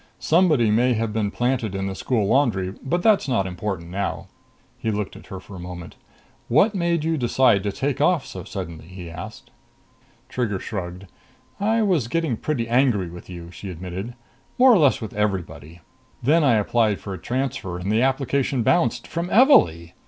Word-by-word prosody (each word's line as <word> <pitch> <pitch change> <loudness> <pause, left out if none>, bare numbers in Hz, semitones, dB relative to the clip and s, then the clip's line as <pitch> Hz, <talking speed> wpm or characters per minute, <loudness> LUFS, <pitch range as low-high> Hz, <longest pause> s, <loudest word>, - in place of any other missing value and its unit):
Somebody 155 - +3
may 125 +4 +3
have 110 -1 -2
been 105 -2 0
planted 120 -3 -1
in 95 0 -2
the 95 - -3
school 110 +2 -1
laundry, 100 -7 +1
but 175 +6 -1
that's 215 -8 +4
not 120 -7 +1
important 90 -2 -5
now." 100 +1 -3 0.5
He 110 - -2
looked 105 -2 -3
at - - -13
her 95 - -7
for 95 +2 -12
a - - -8
moment. 90 -1 -8 0.5
"What 155 - +4
made 170 -4 0
you 160 0 0
decide 120 -4 +3
to 100 0 -2
take 135 +6 -2
off 160 -1 +2
so 90 - -8
suddenly?" 85 -5 -7
he 90 -2 -9
asked. 95 +6 -9 0.8
Trigger 115 -6 -2
shrugged. 90 -2 -6 0.5
"I 220 +3 +2
was 175 - +1
getting 160 -2 -1
pretty 120 -1 -2
angry 115 -8 +2
with 90 +1 -11
you," 85 -1 -9
she 95 +2 -8
admitted. 95 +6 -6 0.4
"More 255 0 +7
or 205 - +5
less 145 -5 +3
with 110 - -6
everybody. 85 -6 -3 0.4
Then 155 +6 +4
I 130 -5 +4
applied 110 0 +1
for 100 - -7
a 95 - -7
transfer, 125 -8 -3
and 90 +3 -3
the 110 +2 +2
application 135 -1 0
bounced 175 - +1
from 170 +1 -3
Evalee! 210 - +5
110 Hz, 180 wpm, -23 LUFS, 95-140 Hz, 0.8 s, More